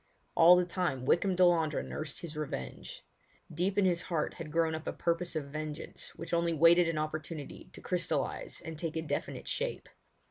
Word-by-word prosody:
All 170 +2 +8
the 180 0 +3
time 175 -8 -2
Wykham 185 +6 +3
Delandre 170 -4 +3
nursed 155 -2 -5
his 165 -3 -7
revenge. 150 -2 -6 0.5
Deep 180 +5 0
in 200 - +4
his 175 -2 +2
heart 160 -4 -1
had 165 -3 -8
grown 165 0 +2
up 160 0 -5
a - - -1
purpose 170 0 -1
of 140 -3 -3
vengeance 155 +1 -6
which 165 +1 -7
only 170 0 +2
waited 170 +2 +6
an 165 - -2
opportunity 155 0 -5
to - - -11
crystallise - - -2
and 160 -1 -7
take 165 -2 -3
a 160 - -1
definite 160 - -4
shape. - - -3
165 Hz, 180 wpm, -32 LUFS, 155-175 Hz, 0.5 s, All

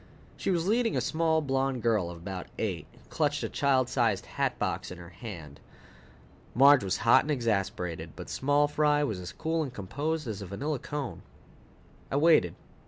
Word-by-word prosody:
She - - -3
was 175 -3 +1
leading 230 +2 +2
a - - +3
small 160 -1 +1
blonde 135 -3 -1
girl 110 -7 +2
of 85 - -8
about 90 +2 -6
eight, - - -3
who - - -23
clutched - - 0
a - - -2
child 135 -3 +2
size 115 -7 +1
hatbox - - -2
in 90 - -8
her 85 -1 -11
hand. 85 - -9 1.0
Marge 140 0 +7
was 95 0 0
hot 115 - +6
and 150 - -7
exasperated, 95 - -1
but - - -8
small 145 +2 +2
fry 150 0 +2
was 110 -9 -2
as 90 -1 -7
cool 160 - -1
and 140 -5 -3
composed 145 - -3
as 105 -2 -4
a 100 - -6
vanilla 135 - -3
cone. 145 -2 -5 0.9
I - - -2
waited. 145 - +4
130 Hz, 175 wpm, -29 LUFS, 95-150 Hz, 1.0 s, Marge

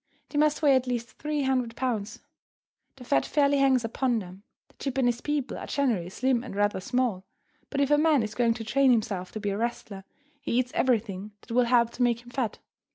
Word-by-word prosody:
They 290 - -1
must 305 +1 +2
weigh 280 -2 +6
at 260 0 +1
least 240 -1 -4
three 300 -1 -1
hundred 255 -3 0
pounds. 230 -5 -3 0.7
The 265 - -12
fat 135 - +2
fairly 285 -1 +2
hangs 260 -3 +3
upon 240 +1 0
them. 185 -2 -7 0.3
The - - -25 0.2
Japanese 245 -2 0
people 295 -3 -2
are - - -7
generally 230 -12 0
slim 250 +4 0
and 250 - -8
rather 205 -1 +1
small, 235 -3 -1 0.5
but 280 - -1
if 280 +1 +1
a 295 - +5
man 305 -5 +4
is 215 - -4
going 235 -2 +2
to 230 - -6
train 275 +4 +3
himself 205 -6 -1
to 215 - -4
be 205 -1 -2
a 200 - -2
wrestler, 220 -4 -4 0.4
he 235 - -1
eats 250 0 0
everything 215 -5 0
that - - -14
will 245 +1 +3
help 235 -1 +3
to 250 - -7
make 240 -1 +2
him 240 - -14
fat. 245 -5 -2
245 Hz, 215 wpm, -27 LUFS, 220-265 Hz, 0.7 s, weigh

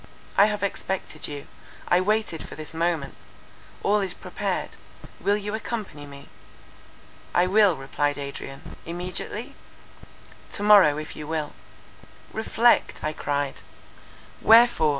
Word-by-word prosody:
I 200 - +7
have 210 -2 -2
expected 190 -5 -3
you. 145 -1 -7 0.4
I 175 - +4
waited 210 -4 0
for - - -8
this 155 +1 -7
moment; 165 -4 -1 0.7
all 210 +1 +3
is 190 -3 -2
prepared;—will 205 +1 -4
you 205 0 -5
accompany 215 -10 -5
me?" 140 0 -12 1.1
"I 175 - +5
will," 200 -1 +5
replied 145 +1 -1
Adrian. 140 -1 -8
"Immediately?" 180 +7 -5 1.0
"To 205 - 0
morrow 200 -8 +7
if 155 0 -6
you 150 - -7
will." 155 -2 -3 0.8
"Reflect!" 230 +2 +2
I 155 - -1
cried. 145 -2 -2 0.8
"Wherefore?" 225 -8 +6
175 Hz, 115 wpm, -25 LUFS, 150-210 Hz, 1.1 s, I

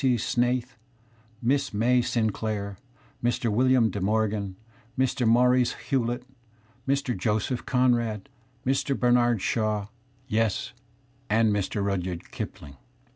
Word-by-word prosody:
C. 130 -3 +3
Snait 120 +2 +1
h, - - -23 0.8
Miss 135 -1 +1
May 125 +4 +3
Sinclair, 110 -4 -2 0.4
Mr. 120 -1 +1
William 125 0 +3
De 100 - -4
Morgan, 105 -1 0 0.4
Mr. 130 -2 +1
Maurice 125 +2 +4
Hewlett, 120 -2 -2 0.6
Mr. 135 -2 0
Joseph 110 +5 -1
Conrad, 120 -5 +1 0.4
Mr. 135 +1 0
Bernard 120 -3 +3
Shaw, 110 -5 0 0.4
yes, 110 -2 0 0.6
and 110 0 +3
Mr. 100 0 -1
Rudyard 90 -3 -3
Kipling. 70 -2 -7
115 Hz, 110 wpm, -26 LUFS, 105-125 Hz, 0.8 s, Maurice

